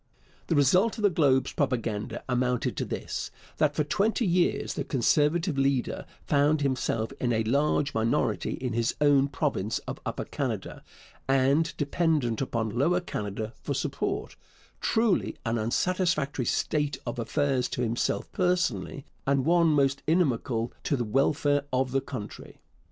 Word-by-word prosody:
The 165 Hz, -, +1 dB
result 180 Hz, -, +3 dB
of 215 Hz, -, -5 dB
the 205 Hz, -, +5 dB
Globe's 140 Hz, -6 st, +2 dB
propaganda 115 Hz, -6 st, -2 dB
amounted 125 Hz, -1 st, 0 dB
to -, -, -1 dB
this, -, -, -4 dB, 0.3 s
that 150 Hz, -1 st, +2 dB
for 150 Hz, -, +2 dB
twenty 215 Hz, -, +1 dB
years 175 Hz, -1 st, +1 dB
the 145 Hz, -, -3 dB
Conservative 150 Hz, -, +1 dB
leader 135 Hz, -2 st, 0 dB, 0.2 s
found 145 Hz, +1 st, +3 dB
himself 130 Hz, -4 st, -1 dB
in 125 Hz, -, 0 dB
a 110 Hz, -1 st, +1 dB
large 140 Hz, +4 st, +1 dB
minority 110 Hz, +1 st, 0 dB
in 125 Hz, -2 st, -3 dB
his 115 Hz, 0 st, 0 dB
own 145 Hz, -2 st, +4 dB
province 135 Hz, -, -1 dB
of -, -, -5 dB
Upper -, -, -4 dB
Canada, -, -, -4 dB, 0.4 s
and 135 Hz, +4 st, +3 dB
dependent 145 Hz, -6 st, 0 dB
upon 115 Hz, -4 st, -1 dB
Lower 150 Hz, +10 st, +2 dB
Canada 110 Hz, -, -5 dB
for 140 Hz, -, -3 dB
support 385 Hz, -, -2 dB, 0.4 s
truly 225 Hz, -3 st, +1 dB
an 115 Hz, 0 st, 0 dB
unsatisfactory 150 Hz, -, 0 dB
state 145 Hz, -2 st, 0 dB
of 120 Hz, 0 st, -4 dB
affairs 135 Hz, +1 st, 0 dB
to 125 Hz, -, -2 dB
himself 120 Hz, 0 st, -1 dB
personally, 180 Hz, -, 0 dB, 0.2 s
and 140 Hz, -1 st, +2 dB
one 170 Hz, +1 st, +4 dB
most 140 Hz, -3 st, +2 dB
inimical 130 Hz, -8 st, +1 dB
to 140 Hz, -, +1 dB
the 120 Hz, -, -1 dB
welfare 145 Hz, +4 st, +1 dB
of 130 Hz, 0 st, 0 dB
the 135 Hz, +1 st, +1 dB
country. 125 Hz, -8 st, -8 dB
140 Hz, 145 wpm, -27 LUFS, 120-155 Hz, 0.4 s, the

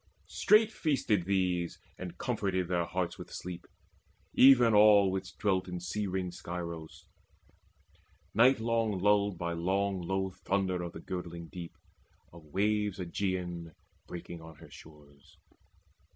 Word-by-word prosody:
Straight 215 Hz, +1 st, +4 dB
feasted 130 Hz, -, 0 dB
these, 90 Hz, -3 st, 0 dB, 0.2 s
And 90 Hz, -1 st, -7 dB
comforted 100 Hz, -7 st, -1 dB
their 85 Hz, -1 st, 0 dB
hearts 85 Hz, -1 st, -3 dB
with -, -, -9 dB
sleep, 90 Hz, -1 st, -7 dB, 0.7 s
even 125 Hz, -4 st, +7 dB
all 105 Hz, -2 st, +6 dB
Which 95 Hz, 0 st, -5 dB
dwelt 95 Hz, -3 st, 0 dB
in 90 Hz, -1 st, -4 dB
sea 100 Hz, +4 st, -3 dB
ringed 90 Hz, -1 st, -3 dB
Scyros, 85 Hz, -2 st, -7 dB, 1.3 s
nightlong 115 Hz, -3 st, +3 dB
lulled 100 Hz, -1 st, +2 dB
By 85 Hz, 0 st, -2 dB
long 95 Hz, +3 st, 0 dB
low 95 Hz, +2 st, -1 dB
thunder 95 Hz, -1 st, -1 dB
of 85 Hz, -1 st, -5 dB
the 80 Hz, -, -8 dB
girdling 85 Hz, -3 st, -6 dB
deep, 85 Hz, -2 st, -9 dB, 0.6 s
Of 85 Hz, -2 st, -13 dB
waves 105 Hz, +4 st, 0 dB
Aegean 90 Hz, -2 st, -3 dB, 0.3 s
breaking 85 Hz, -1 st, -8 dB
on 80 Hz, 0 st, -12 dB
her -, -, -15 dB
shores. 75 Hz, -2 st, -16 dB
95 Hz, 125 wpm, -31 LUFS, 85-100 Hz, 1.3 s, even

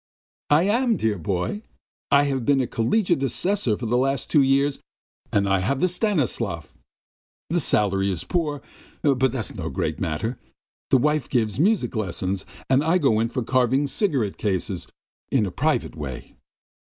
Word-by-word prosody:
"I 150 Hz, +3 st, +5 dB
am, 230 Hz, +4 st, +2 dB
dear 105 Hz, -4 st, 0 dB
boy! 95 Hz, -, -2 dB, 0.5 s
I 140 Hz, +1 st, +5 dB
have 135 Hz, -3 st, -1 dB
been 140 Hz, +3 st, +3 dB
a 130 Hz, -, +1 dB
collegiate 175 Hz, -, +1 dB
assessor 135 Hz, -, 0 dB
for 120 Hz, -, -5 dB
the 120 Hz, +2 st, +1 dB
last 135 Hz, -1 st, -1 dB
two 150 Hz, -, +5 dB
years 140 Hz, +1 st, +2 dB, 0.5 s
and 100 Hz, -1 st, +2 dB
I 95 Hz, -1 st, +2 dB
have 125 Hz, +9 st, 0 dB
the 185 Hz, -, +3 dB
Stanislav. 140 Hz, -, -1 dB, 0.8 s
The 175 Hz, 0 st, +1 dB
salary 100 Hz, -6 st, +1 dB
is 90 Hz, -, -3 dB
poor, 150 Hz, -5 st, -2 dB, 0.4 s
but 130 Hz, -3 st, +3 dB
that's 120 Hz, -5 st, -4 dB
no -, -, -4 dB
great -, -, -2 dB
matter! 110 Hz, +10 st, -2 dB, 0.5 s
The -, -, +5 dB
wife 150 Hz, +1 st, +1 dB
gives 110 Hz, -3 st, 0 dB
music 200 Hz, -, +2 dB
lessons, 95 Hz, -2 st, -2 dB, 0.2 s
and 135 Hz, +2 st, +3 dB
I 165 Hz, +3 st, +3 dB
go 135 Hz, -10 st, +2 dB
in 115 Hz, +1 st, +1 dB
for 125 Hz, 0 st, -2 dB
carving 130 Hz, +2 st, +2 dB
wooden 145 Hz, -, -1 dB
cigarette 135 Hz, -, 0 dB
cases 95 Hz, -3 st, -2 dB, 0.4 s
in 125 Hz, -6 st, +3 dB
a 95 Hz, -, -4 dB
private 150 Hz, -, 0 dB
way. 70 Hz, -5 st, -7 dB
130 Hz, 165 wpm, -24 LUFS, 105-150 Hz, 0.8 s, I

